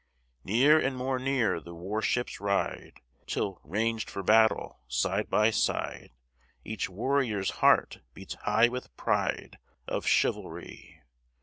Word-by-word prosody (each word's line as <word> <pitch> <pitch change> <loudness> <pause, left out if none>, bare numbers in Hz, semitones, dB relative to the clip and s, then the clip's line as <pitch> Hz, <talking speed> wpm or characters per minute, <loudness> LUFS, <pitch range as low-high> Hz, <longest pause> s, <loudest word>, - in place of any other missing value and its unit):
Near 135 +10 +5
and 135 -3 -1
more 130 0 -1
near 125 -9 +1
the 85 +2 -11
war 95 +6 -3
ships 120 +2 -1
ride, 100 -1 -2 0.3
Till, 95 -2 -3
ranged 110 +6 -1
for 100 - -5
battle, 110 +3 +3
side 65 -1 -1
by 105 +1 +3
side, - - -1 0.6
Each 110 -2 -3
warrior's 110 -1 0
heart - - +4 0.2
beats 95 - -8
high 110 +3 +3
with 125 - -7
pride - - -1 0.3
Of - - -3
chivalry. - - -2
110 Hz, 125 wpm, -29 LUFS, 100-125 Hz, 0.6 s, Near